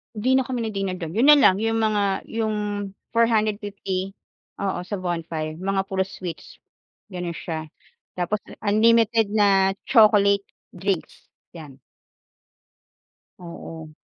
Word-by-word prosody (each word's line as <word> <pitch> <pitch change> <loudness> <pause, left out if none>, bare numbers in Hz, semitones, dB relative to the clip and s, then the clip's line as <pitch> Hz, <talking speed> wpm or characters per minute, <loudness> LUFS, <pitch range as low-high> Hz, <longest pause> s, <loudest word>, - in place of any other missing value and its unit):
'Di 255 +5 +2
na 265 - +2
kami 250 -3 -2
nag-dinner 195 -4 -2
do'n, 165 -3 -6
yun 240 +6 +3
na 295 - +10
lang, 195 -9 +5
yung 225 +1 0
mga 215 -2 +1 0.3
yung 220 -1 -1 0.6
₱450 205 -4 0 0.5
oo, 195 -2 -1
sa 205 - -3
bonfire, 165 -3 -4
mga 195 +1 0
puro 190 -1 0
sweets, 180 -4 -8 0.5
ganon 175 -2 -4
siya. 160 -1 -5 0.5
Tapos 205 +4 -1 0.2
unlimited 225 +1 +3
na 200 -2 +3
chocolate 205 -5 +5 0.3
drinks, 190 -1 -4 0.2
'yan. 150 -5 -11 1.6
Oo. 165 -2 -9
200 Hz, 115 wpm, -23 LUFS, 180-220 Hz, 1.6 s, na